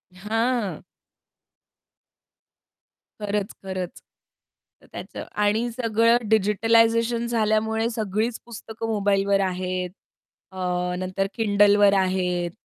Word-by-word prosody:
हां. 225 Hz, +2 st, -1 dB, 2.4 s
खरंच, 205 Hz, -1 st, -2 dB
खरंच. 185 Hz, -2 st, -5 dB, 0.8 s
तर -, -, -20 dB
त्याचं -, -, -8 dB, 0.2 s
आणि 220 Hz, +4 st, +1 dB
सगळं 230 Hz, 0 st, +2 dB
डिजिटलायझेशन 230 Hz, +3 st, +3 dB
झाल्यामुळे 220 Hz, 0 st, +1 dB
सगळीच 220 Hz, +1 st, -2 dB
पुस्तकं 225 Hz, -1 st, -7 dB
मोबाईलवर 200 Hz, -2 st, +1 dB
आहेत. 185 Hz, -1 st, -2 dB, 0.6 s
अ, 190 Hz, -, -12 dB, 0.4 s
नंतर 185 Hz, +1 st, -2 dB
Kindleवर 205 Hz, -1 st, +4 dB
आहेत. 180 Hz, -2 st, 0 dB
210 Hz, 80 wpm, -24 LUFS, 195-225 Hz, 2.4 s, Kindleवर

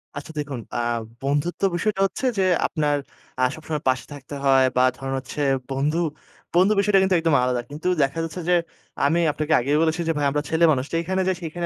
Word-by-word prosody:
আচ্ছা, 145 Hz, +2 st, -7 dB
দেখুন 140 Hz, -4 st, -4 dB, 0.2 s
আ -, -, 0 dB, 0.4 s
বন্ধুত্ব 145 Hz, +6 st, -1 dB
বিষয়টা 195 Hz, +2 st, 0 dB
হচ্ছে 195 Hz, +7 st, -3 dB
যে, 190 Hz, -, +3 dB, 0.2 s
আপনার 150 Hz, -3 st, 0 dB, 0.4 s
আ -, -, +3 dB
সবসময় 155 Hz, -1 st, -4 dB
পাশে 130 Hz, 0 st, 0 dB
থাকতে 145 Hz, 0 st, -9 dB
হয়, 135 Hz, -1 st, +5 dB
বা 125 Hz, -, +5 dB
ধরেন 135 Hz, 0 st, -4 dB
হচ্ছে 130 Hz, +3 st, -6 dB, 0.3 s
বন্ধু, 145 Hz, +5 st, 0 dB, 0.6 s
বন্ধু 185 Hz, +4 st, +5 dB
বিষয়টা 200 Hz, -1 st, +4 dB
কিন্তু 190 Hz, -1 st, +2 dB
একদম 165 Hz, -2 st, +2 dB
আলাদা। 125 Hz, -1 st, 0 dB
কিন্তু 150 Hz, +5 st, -5 dB, 0.2 s
দেখা 135 Hz, +4 st, -1 dB
যাচ্ছে, 165 Hz, +2 st, -5 dB
যে, 180 Hz, -, +5 dB, 0.5 s
আমি 160 Hz, +4 st, +2 dB
আপনাকে 155 Hz, +1 st, -1 dB
আগেই 140 Hz, +5 st, +1 dB
বলেছি, 160 Hz, +1 st, +1 dB
যে, 165 Hz, -, +3 dB
ভাই 145 Hz, -, 0 dB
আমরা 150 Hz, -, 0 dB
ছেলে 160 Hz, +1 st, +1 dB
মানুষ। 130 Hz, -3 st, 0 dB
যেইখানে 180 Hz, +3 st, 0 dB
যাই, 190 Hz, -, +2 dB
সেইখানে 170 Hz, +1 st, -4 dB
155 Hz, 195 wpm, -23 LUFS, 140-175 Hz, 0.6 s, হয়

